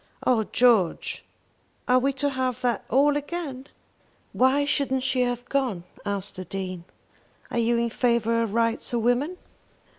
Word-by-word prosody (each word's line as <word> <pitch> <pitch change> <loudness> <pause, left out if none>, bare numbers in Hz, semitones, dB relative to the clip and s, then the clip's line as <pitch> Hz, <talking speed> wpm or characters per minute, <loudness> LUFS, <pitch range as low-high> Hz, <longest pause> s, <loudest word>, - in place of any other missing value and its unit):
"Oh 230 -4 +3
George, 225 -9 +2 0.6
are 250 0 +5
we 275 +2 +1
to 285 +2 0
have 255 -2 -2
that 245 -1 0
all 285 +3 +4
again?" 290 -3 -4 0.7
"Why 270 +3 +3
shouldn't 275 -2 0
she 260 -1 +1
have 245 0 -1
gone?" 255 -11 -1 0.2
asked 200 -1 -4
the 185 - -6
Dean. 185 -1 -5 0.7
"Are 235 - 0
you 235 +1 +2
in 235 0 0
favour 230 -1 +1
of 225 -2 -2
rights 230 +1 0
of 235 -2 0
women?" 265 +9 +1
245 Hz, 150 wpm, -25 LUFS, 230-265 Hz, 0.7 s, are